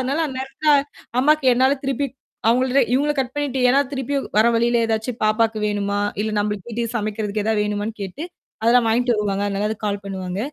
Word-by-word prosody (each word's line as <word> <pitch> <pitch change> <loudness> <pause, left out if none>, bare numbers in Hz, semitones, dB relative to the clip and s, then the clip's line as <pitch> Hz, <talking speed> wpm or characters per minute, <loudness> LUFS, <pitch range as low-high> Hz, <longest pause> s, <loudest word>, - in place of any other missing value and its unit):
அதனால 275 +5 0
அந்த 265 -3 -6
நேரத்துல 270 +3 -4 0.5
அம்மாக்கு 300 0 +3
என்னால 260 +2 +4
திருப்பி 275 +1 0 0.4
அவங்கள்ட்ட 255 +3 +3
இவங்கள 290 +3 +2
கட் 255 +1 -4
பண்ணிட்டு, 280 -3 -1
ஏன்னா 270 +3 +4
திருப்பி 270 +1 -3 0.2
வர 215 +2 +5
வழியில 235 +1 +2
ஏதாச்சும் 225 +2 -2
பாப்பாக்கு 220 +1 +2
வேணுமா? 205 -1 -1 0.2
இல்ல 220 - -1
நம்மளுக்கு 210 0 -2
வீட்டுக்கு 230 +1 -3
சமைக்கிறதுக்கு 210 0 -2
எதாவது 215 -1 +1
வேணுமான்னு 210 +1 -3
கேட்டு, 195 - -6 0.4
அதெல்லாம் 235 +1 +4
வாங்கிட்டு 240 +2 +2
வருவாங்க. 205 -1 -1
அதனால 200 +1 -1
அதுக்கு 215 0 -4
கால் 200 -1 -2
பண்ணுவாங்க. 190 -1 -5
225 Hz, 175 wpm, -21 LUFS, 210-260 Hz, 0.5 s, வர